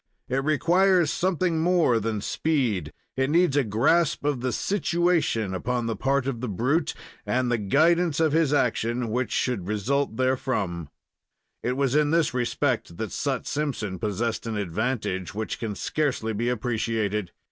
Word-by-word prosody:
It 135 Hz, +2 st, -1 dB
requires 170 Hz, +3 st, +3 dB
something 180 Hz, -2 st, 0 dB
more 165 Hz, -8 st, +3 dB
than 110 Hz, -1 st, -2 dB
speed 130 Hz, -, 0 dB, 0.2 s
it 130 Hz, +1 st, +1 dB
needs 170 Hz, -2 st, +3 dB
a 145 Hz, -, +4 dB
grasp 140 Hz, +9 st, +2 dB
of 145 Hz, -4 st, 0 dB
the 130 Hz, 0 st, -1 dB
"situation," 170 Hz, -, 0 dB
upon 120 Hz, +5 st, -2 dB
the 115 Hz, -1 st, -1 dB
part 135 Hz, -1 st, 0 dB
of 130 Hz, -4 st, -3 dB
the 125 Hz, -, -2 dB
brute, 130 Hz, -, 0 dB, 0.3 s
and 120 Hz, +3 st, 0 dB
the 120 Hz, -, +1 dB
guidance 160 Hz, -, +2 dB
of 160 Hz, -2 st, +3 dB
his 160 Hz, -2 st, +2 dB
action 120 Hz, -3 st, 0 dB
which 125 Hz, +2 st, -1 dB
should 110 Hz, -8 st, -1 dB
result 115 Hz, +5 st, 0 dB
therefrom. 105 Hz, -, -1 dB, 0.7 s
It 125 Hz, +2 st, -1 dB
was 135 Hz, -2 st, +1 dB
in 150 Hz, 0 st, +3 dB
this 165 Hz, -3 st, +2 dB
respect 120 Hz, -8 st, -1 dB
that 110 Hz, -, -4 dB
Sut 140 Hz, -2 st, -2 dB
Simpson 125 Hz, -11 st, -3 dB
possessed 115 Hz, +2 st, -2 dB
an 110 Hz, -2 st, -2 dB
advantage 100 Hz, -1 st, -2 dB
which 110 Hz, 0 st, -3 dB
can 110 Hz, -4 st, -3 dB
scarcely 125 Hz, -4 st, -1 dB
be 120 Hz, +3 st, -1 dB
appreciated. 110 Hz, -4 st, -1 dB
125 Hz, 155 wpm, -25 LUFS, 110-150 Hz, 0.7 s, a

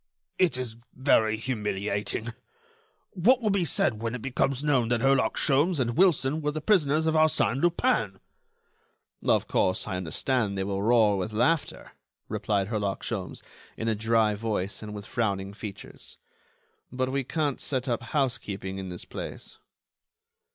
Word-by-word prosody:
"It 180 Hz, -8 st, +3 dB
is 120 Hz, -3 st, -5 dB, 0.2 s
very 110 Hz, -5 st, +3 dB
humiliating. 105 Hz, -1 st, -2 dB, 0.8 s
What 230 Hz, +8 st, +4 dB
will 215 Hz, -4 st, 0 dB
be 195 Hz, -3 st, +1 dB
said 110 Hz, -6 st, +1 dB
when 115 Hz, +1 st, -2 dB
it 125 Hz, -, -6 dB
becomes 135 Hz, +1 st, 0 dB
known 135 Hz, -6 st, +2 dB
that 120 Hz, -1 st, +1 dB
Herlock 135 Hz, 0 st, +2 dB
Sholmes 150 Hz, +4 st, +2 dB
and 120 Hz, -2 st, 0 dB
Wilson 160 Hz, -5 st, +3 dB
were 150 Hz, -, 0 dB
the 150 Hz, +1 st, -3 dB
prisoners 155 Hz, -4 st, +2 dB
of 160 Hz, -, +2 dB
Arsène 155 Hz, -4 st, +2 dB
Lupin?" 115 Hz, -, +1 dB, 1.0 s
"Of -, -, +2 dB
course, 95 Hz, +2 st, +1 dB
I 95 Hz, -3 st, -2 dB
understand 100 Hz, +4 st, -1 dB
they 95 Hz, -, 0 dB
will 100 Hz, 0 st, -2 dB
roar 110 Hz, -2 st, +4 dB
with 110 Hz, +4 st, -3 dB
laughter," 130 Hz, +8 st, 0 dB, 0.4 s
replied 100 Hz, -2 st, -1 dB
Herlock 105 Hz, -3 st, -2 dB
Sholmes, 100 Hz, -6 st, -5 dB, 0.3 s
in 115 Hz, -, -3 dB
a 115 Hz, -, +2 dB
dry 110 Hz, 0 st, +2 dB
voice 105 Hz, -2 st, -3 dB
and 105 Hz, -1 st, -7 dB
with 100 Hz, -1 st, -7 dB
frowning 100 Hz, -4 st, -2 dB
features, 100 Hz, -1 st, -10 dB, 0.7 s
"but 130 Hz, +1 st, -1 dB
we 135 Hz, 0 st, 0 dB
can't 145 Hz, 0 st, -1 dB
set 130 Hz, -1 st, -1 dB
up 120 Hz, -2 st, 0 dB
housekeeping 105 Hz, -9 st, -2 dB
in 95 Hz, -1 st, -6 dB
this 90 Hz, -1 st, -6 dB
place." -, -, -8 dB
115 Hz, 150 wpm, -27 LUFS, 105-140 Hz, 1.0 s, What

